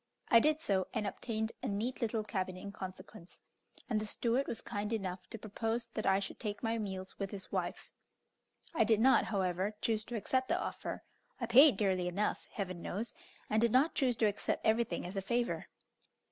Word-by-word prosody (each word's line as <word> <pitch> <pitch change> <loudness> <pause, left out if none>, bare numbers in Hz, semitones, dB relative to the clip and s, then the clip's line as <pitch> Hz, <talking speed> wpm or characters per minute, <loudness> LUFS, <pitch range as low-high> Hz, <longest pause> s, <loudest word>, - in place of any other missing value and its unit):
I 230 - +8
did 305 +5 +2
so, 190 - +1
and 215 -2 0
obtained 220 +1 -2
a - - -2
neat 215 +5 -2
little 225 -1 0
cabin 185 -3 -2
in 200 +2 -7
consequence, 185 -1 -9 0.5
and 220 -4 +1
the 215 - -4
steward 240 +5 0
was 225 - -3
kind 205 +1 -4
enough 190 -4 -3
to 225 - -5
propose 225 +2 -2
that 215 - -2
I 195 0 +5
should 200 - -5
take 210 0 -4
my 225 0 0
meals 190 -2 -5
with 195 -1 -2
his 195 -1 -8
wife. - - -3 0.8
I 315 - +4
did 220 -1 +4
not, 260 +4 +5
however, 190 0 0
choose 220 -1 +1
to 240 - -5
accept 260 +4 0
the 345 - +2
offer; - - -4 0.4
I 240 - -1
paid 250 +1 +8
dearly 190 -3 +1
enough, 195 +4 -1
Heaven 185 -4 -4
knows, 210 +6 -3 0.3
and 215 +1 +2
did 235 -1 +4
not 270 +7 +4
choose 255 -4 +2
to 225 - +2
accept 205 -1 0
everything 225 -2 +2
as 180 +3 -6
a 195 - 0
favour. 235 +5 -1
215 Hz, 195 wpm, -34 LUFS, 195-235 Hz, 0.8 s, I